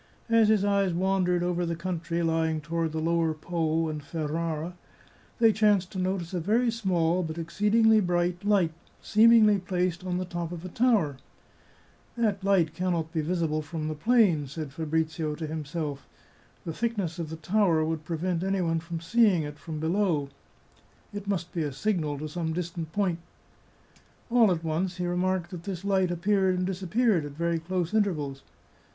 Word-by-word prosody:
As 225 -1 +5
his 210 -2 +3
eyes 200 -3 +2
wandered 180 -1 +1
over 175 0 0
the 170 -1 -1
country 170 -1 -3
lying 160 -1 +1
to 155 - -16
ward 165 -1 0
the 160 - -4
lower 165 0 +1
Po 165 0 -1
and 155 -1 -4
Ferrara, 160 +2 -3 0.6
they 225 -2 +5
chanced 205 -4 +2
to 190 - -5
notice 185 -1 -2
a 180 - 0
very 230 +8 +2
small, 185 -6 +1
but 160 -2 -4
exceedingly 210 +6 +3
bright, 175 -1 0
light, 200 -5 +3 0.3
seemingly 215 -2 +5
placed 180 -1 -1
on 180 -1 -2
the 185 - -2
top 175 -1 -4
of 175 0 -7
a - - -5
tower. 205 - +2 0.5
" - - -32
That 210 -4 0
light 185 -5 +2
can 180 +2 -1
not 160 -1 -2
be 160 - 0
visible 160 -1 -1
from 155 0 -5
the - - -2
plain," 170 - +3
said 150 0 -6
Fabrizio 160 0 -1
to 160 - -5
himself. 150 -2 -4 0.3
" - - -32
The 165 - -3
thickness 200 -6 -2
of 165 -2 -4
the 160 - -5
tower 165 -1 +2
would 160 -1 -3
prevent 170 +2 -2
any 195 0 0
one 165 -1 +1
from 165 0 -6
seeing 200 -2 +3
it 150 0 -7
from 155 -1 -6
below. 160 -3 0 0.8
It 205 -1 -6
must 180 -4 -2
be 170 - -1
a 150 -2 -1
signal 155 -1 -1
to 155 +2 -5
some 160 0 -3
distant 170 -2 -4
point." 180 -2 0 1.1
All 230 -4 +5
at 170 -2 -1
once 175 +3 -1
he 180 - -2
remarked 180 0 -1
that 180 -3 -6
this 195 -2 -5
light 190 -2 +2
appeared 190 +1 +1
and 180 - 0
disappeared 190 +1 +1
at 145 -1 -7
very 170 +2 -1
close 175 +2 -2
intervals. 155 -11 0
175 Hz, 180 wpm, -27 LUFS, 160-195 Hz, 1.1 s, As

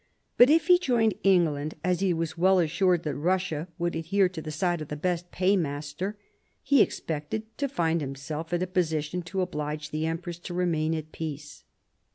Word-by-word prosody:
But 245 +2 +7
if 320 +1 +4
he 360 -1 +6
joined 235 - +2
England, 155 -6 +2
as 180 0 +1
he 195 -1 +2
was 165 -1 -2
well 185 +2 +4
assured 175 +1 +2
that 150 - -2
Russia 170 0 -1
would 175 0 -1
adhere 185 +4 +2
to 175 -3 -7
the 155 - -7
side 175 +2 -1
of 155 - -5
the 150 - -4
best 175 +2 -2
paymaster, 180 0 -1 0.5
he 280 -4 +5
expected 160 +7 -2 0.2
to 280 -1 0
find 170 - 0
himself 145 +4 -5
in 175 +1 +1
a - - +1
position 175 -2 -1
to 185 +3 -3
oblige 150 -3 -3
the 155 +1 -1
empress 170 +1 -4
to 175 0 -7
remain 165 -3 +1
at 155 0 -6
peace. 150 -2 -7
170 Hz, 185 wpm, -27 LUFS, 155-185 Hz, 0.5 s, But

